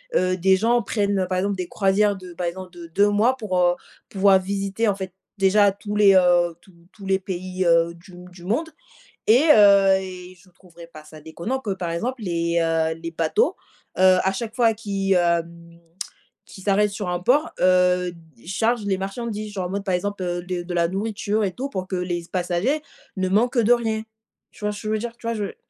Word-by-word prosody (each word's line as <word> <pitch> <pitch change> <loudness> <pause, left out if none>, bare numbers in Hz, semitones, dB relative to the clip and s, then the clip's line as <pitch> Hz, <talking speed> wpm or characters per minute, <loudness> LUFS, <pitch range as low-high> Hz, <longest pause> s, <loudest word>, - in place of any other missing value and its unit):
heu, 185 0 +2
des 190 +1 +3
gens 235 +3 +2
prennent, 200 -1 -1
heu, 185 - 0
par 185 0 -1
exemple 200 +1 0
des 180 -2 -5
croisières 200 0 +2
de 180 -2 -11
par 175 +1 -4
exemple 185 +1 -6
de 170 -2 -11
2 200 +5 +2
mois 230 +6 +2
pour, 205 -6 -3
heu, 175 0 +3 0.3
pouvoir 195 -1 +4
visiter, 195 +3 -1
en 195 - 0
fait, 190 -2 -7 0.2
déjà 200 +1 +4
tous 205 +1 -7
les, 205 -2 +6
heu, 175 -2 +4
tous 190 - -22 0.2
tous 200 - -13
les 190 0 +1
pays, 185 0 -4
heu, 170 0 +3
du 170 +3 -17 0.2
du 175 -1 -15
monde 245 - -1 0.6
et 240 +6 +5
heu 200 -2 +6
et 185 -1 -9
je 190 - -22
trouverais 170 -2 -15
pas 155 -2 -14
ça 155 0 -13
déconnant 170 - -4
que, 225 -6 -5
par 175 -3 -4
exemple, 235 +8 -3
les, 170 -2 0
heu, 160 0 0
les 165 0 -6
bateaux, 165 - 0 0.4
heu, 185 0 +6
à 190 - +2
chaque 220 +3 -5
fois 230 -2 +4
qu'ils, 200 -3 -2
hem, 170 -1 -1 0.7
qu'ils 190 - -13
s'arrêtent 205 +1 +2
sur 200 -2 -5
un 180 0 -1
port, 290 - +2
heu, 180 -1 +3
d 160 -7 -20
chargent 220 +4 0
les 190 -2 0
marchandises, 210 +1 -5
genre, 190 -3 -3
en - - -6
mode, 200 0 -3
par 190 -2 0
exemple, 205 +1 -4
heu, 175 0 -3
de 180 -1 -3
de 175 0 -6
la 170 -1 +2
nourriture 210 +2 -2
et 190 - -1
tout 265 +8 -5
pour 185 -4 -5
que 190 - -2
les 180 -1 -2
c - - -17
passagers 185 - 0 0.3
ne 185 0 -1
manquent 235 +6 +1
de 235 +1 +4
rien. 225 -2 0 0.5
Tu - - -11
vois 210 - +1
ce 205 - -9
que 215 - -5
veux 220 - +1
dire? 235 +1 -6
Tu 230 - -10
vois, 230 - -1
je 210 -2 -2
tu - - -10
190 Hz, 220 wpm, -23 LUFS, 175-210 Hz, 0.7 s, les